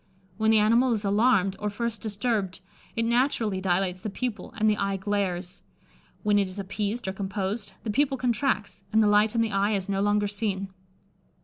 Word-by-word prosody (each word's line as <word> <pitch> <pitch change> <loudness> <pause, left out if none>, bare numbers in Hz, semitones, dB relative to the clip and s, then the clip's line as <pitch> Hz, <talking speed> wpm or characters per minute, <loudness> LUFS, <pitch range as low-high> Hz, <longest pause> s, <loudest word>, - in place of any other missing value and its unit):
When 220 0 +2
the 220 - +6
animal 230 +4 +4
is 210 -2 -2
alarmed, 200 -2 +3
or 210 - -1
first 230 +2 -3
disturbed, 210 -3 -1 0.4
it 230 - 0
naturally 235 -5 +1
dilates 185 0 0
the 215 - -3
pupil, 220 -1 -4
and 215 0 +2
the 210 -1 +3
eye 200 -1 0
glares; 190 -2 -2 0.6
when 210 -1 +3
it 200 - +1
is 185 +1 -9
appeased 205 +3 -3
or 190 - -1
composed, 200 +2 -3
the 220 - -2
pupil 270 +4 +1
contracts, 245 -4 -1
and 220 0 +4
the - - +4
light 210 +2 +4
in 230 - +3
the 225 -1 0
eye 200 +2 +1
is 195 -2 -1
no 195 -1 0
longer 205 0 +2
seen. 200 -2 -2
205 Hz, 190 wpm, -27 LUFS, 195-225 Hz, 0.6 s, the